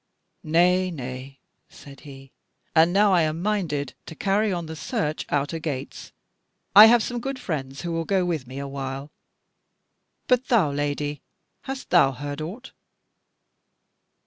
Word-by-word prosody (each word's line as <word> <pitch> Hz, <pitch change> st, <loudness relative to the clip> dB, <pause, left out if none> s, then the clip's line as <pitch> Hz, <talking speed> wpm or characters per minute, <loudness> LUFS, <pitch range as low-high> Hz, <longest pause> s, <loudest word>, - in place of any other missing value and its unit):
"Nay, 180 Hz, +3 st, +3 dB
nay," 130 Hz, -3 st, -7 dB, 0.3 s
said 140 Hz, -1 st, -14 dB
he, 135 Hz, -2 st, -13 dB, 0.4 s
"and 165 Hz, +1 st, +5 dB
now 200 Hz, +1 st, +4 dB
I 175 Hz, -, +4 dB
am 155 Hz, 0 st, -1 dB
minded 170 Hz, -9 st, -1 dB
to 160 Hz, -, -8 dB
carry 205 Hz, +4 st, +1 dB
on 175 Hz, -2 st, -3 dB
the 160 Hz, 0 st, -7 dB
search 155 Hz, 0 st, -3 dB
out 145 Hz, +2 st, 0 dB
a 165 Hz, -, -3 dB
gates. 140 Hz, -4 st, -6 dB, 0.6 s
I 210 Hz, +2 st, +12 dB
have 235 Hz, 0 st, +5 dB
some 245 Hz, +2 st, -3 dB
good 270 Hz, +2 st, -4 dB
friends 140 Hz, -, -5 dB
who 170 Hz, -, -4 dB
will 165 Hz, 0 st, -2 dB
go 190 Hz, -1 st, +1 dB
with 160 Hz, -8 st, -2 dB
me 130 Hz, +2 st, -9 dB
awhile. 140 Hz, 0 st, -5 dB, 1.1 s
But 250 Hz, 0 st, +2 dB
thou, 200 Hz, -, +3 dB
Lady, 145 Hz, 0 st, -2 dB, 0.4 s
hast 270 Hz, 0 st, -6 dB
thou 135 Hz, -7 st, +5 dB
heard 145 Hz, +3 st, -6 dB
aught?" 210 Hz, +12 st, -7 dB
160 Hz, 145 wpm, -24 LUFS, 140-190 Hz, 1.1 s, I